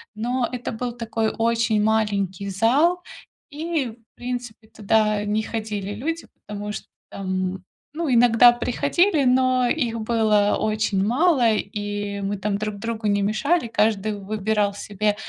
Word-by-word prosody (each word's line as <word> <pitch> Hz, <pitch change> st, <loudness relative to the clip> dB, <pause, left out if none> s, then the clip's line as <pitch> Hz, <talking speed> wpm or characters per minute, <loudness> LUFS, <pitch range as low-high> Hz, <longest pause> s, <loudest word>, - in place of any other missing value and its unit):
но 240 Hz, +2 st, -1 dB
это 245 Hz, -2 st, -4 dB
был 245 Hz, +2 st, -3 dB
такой 225 Hz, -2 st, -2 dB
очень 230 Hz, -1 st, +1 dB
маленький 200 Hz, -3 st, 0 dB
зал, 275 Hz, -, +2 dB, 0.5 s
и, 310 Hz, -2 st, -2 dB
в 225 Hz, 0 st, -22 dB
принципе, 245 Hz, -3 st, -6 dB
туда 215 Hz, -1 st, +1 dB
не 210 Hz, +1 st, 0 dB
ходили 210 Hz, -3 st, -4 dB
люди, 325 Hz, +9 st, -3 dB, 0.2 s
потому 210 Hz, 0 st, -5 dB
что, -, -, -7 dB, 0.2 s
там, 185 Hz, -1 st, -3 dB, 0.3 s
ну, 310 Hz, -4 st, -1 dB
иногда 240 Hz, 0 st, +7 dB
приходили, 285 Hz, +7 st, +1 dB
но 255 Hz, -1 st, +3 dB
их 235 Hz, -7 st, -1 dB
было 215 Hz, -2 st, +2 dB
очень 215 Hz, -2 st, 0 dB
мало, 245 Hz, -, +3 dB
и 205 Hz, -1 st, -3 dB
мы 200 Hz, +1 st, -2 dB
там 200 Hz, +1 st, -1 dB
друг 210 Hz, 0 st, -3 dB
другу 225 Hz, 0 st, -3 dB
не 205 Hz, 0 st, +2 dB
мешали. 245 Hz, -, +1 dB
Каждый 215 Hz, -1 st, 0 dB
выбирал 205 Hz, 0 st, -1 dB
себе 205 Hz, +1 st, -1 dB
220 Hz, 135 wpm, -23 LUFS, 205-245 Hz, 0.5 s, иногда